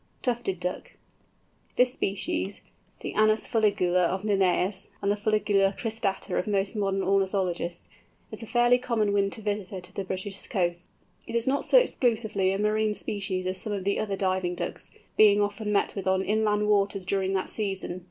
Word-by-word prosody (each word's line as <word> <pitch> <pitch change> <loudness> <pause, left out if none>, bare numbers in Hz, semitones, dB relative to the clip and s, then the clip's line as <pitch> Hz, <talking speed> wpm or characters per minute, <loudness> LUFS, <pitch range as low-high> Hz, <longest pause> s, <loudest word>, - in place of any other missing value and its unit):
TUFTED 235 -7 -1
DUCK. 180 +1 -4 0.8
This 250 0 +3
species, 185 - -2 0.4
the - - -5
Anas 215 +1 +3
fuligula 200 -5 +2
of 190 +3 -3
Linnæus, 195 -1 +1
and 200 - 0
the - - +2
Fuligula 205 -2 +1
cristata 220 -4 -1
of - - -3
most 200 +1 0
modern 195 -2 0
ornithologists, 190 -3 0 0.4
is - - -5
a 225 - -7
fairly 240 +1 +4
common 225 -5 0
winter 200 +2 0
visitor 205 -2 -3
to 180 - -12
the 195 - -3
British 190 +1 -4
coasts. 175 -2 -1 0.4
It 230 - -5
is 235 - +1
not 275 +2 +1
so - - +5
exclusively 220 - +2
a 195 - -1
marine 210 +1 +1
species 195 -3 -2
as 185 0 -1
some 215 - -3
of 195 -2 -3
the 200 +1 0
other 205 -2 -1
diving 185 -2 0
Ducks, - - -5 0.3
being 210 -1 +6
often 205 +1 -1
met 205 - +1
with 195 -2 -5
on 190 0 +2
inland 210 0 +1
waters 200 -2 +1
during 190 0 0
that 190 -1 -1
season. 195 -4 -3
200 Hz, 170 wpm, -27 LUFS, 190-215 Hz, 0.8 s, being